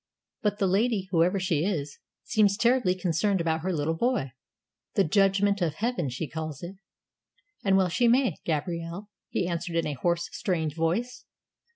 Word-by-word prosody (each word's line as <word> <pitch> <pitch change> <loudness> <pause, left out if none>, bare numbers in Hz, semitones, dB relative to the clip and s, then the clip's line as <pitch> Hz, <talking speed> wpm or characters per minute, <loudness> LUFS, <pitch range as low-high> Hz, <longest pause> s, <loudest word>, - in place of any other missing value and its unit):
"But 205 -1 0
the 200 - +1
lady 195 0 +1
whoever 180 +2 +3
she 170 -4 0
is, 150 -7 -2 0.2
seems 205 -2 +2
terribly 235 -6 +3
concerned 185 +2 0
about 160 -1 0
her 185 +3 -1
little 160 -1 0
boy. 200 - 0 0.6
The 195 - +4
judgment 200 +3 +2
of 160 -3 0
Heaven, 220 - -1
she 130 +6 -4
calls 155 0 -6
it." 185 +3 -7 0.9
"And 195 -1 +4
well 185 -2 +3
she 235 +8 +2
may, 245 - +3
Gabrielle," 170 +5 -3 0.2
he 180 - -1
answered 170 0 -3
in 165 - +1
a 150 - -2
hoarse 170 +4 0
strained 160 -6 -1
voice. 200 +10 -2
180 Hz, 165 wpm, -27 LUFS, 165-205 Hz, 0.9 s, The